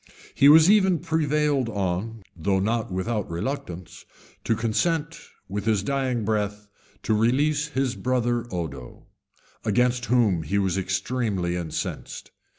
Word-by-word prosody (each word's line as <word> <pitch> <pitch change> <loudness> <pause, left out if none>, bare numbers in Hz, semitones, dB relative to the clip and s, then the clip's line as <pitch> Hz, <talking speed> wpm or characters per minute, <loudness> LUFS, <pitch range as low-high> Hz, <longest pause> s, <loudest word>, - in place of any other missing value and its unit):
He 140 - +6
was 160 +2 +8
even 190 -3 +4
prevailed 150 -5 0
on, 100 +2 -3
though 95 +3 0
not 110 +2 -1
without 105 +3 -2
reluctance, 85 -3 -5 0.4
to 115 - +1
consent, 155 +9 -1 0.3
with 100 +2 -4
his 110 -3 +1
dying 130 -3 -1
breath, 105 -1 -2 0.4
to 110 - +1
release 140 +7 +2
his 135 -3 -1
brother 120 -2 0
Odo, 70 -8 -6 0.6
against 125 +3 +1
whom 115 -9 +2
he 90 +6 -2
was 95 -2 +1
extremely 95 -1 -1
incensed. 85 -3 -5
115 Hz, 125 wpm, -25 LUFS, 95-135 Hz, 0.6 s, was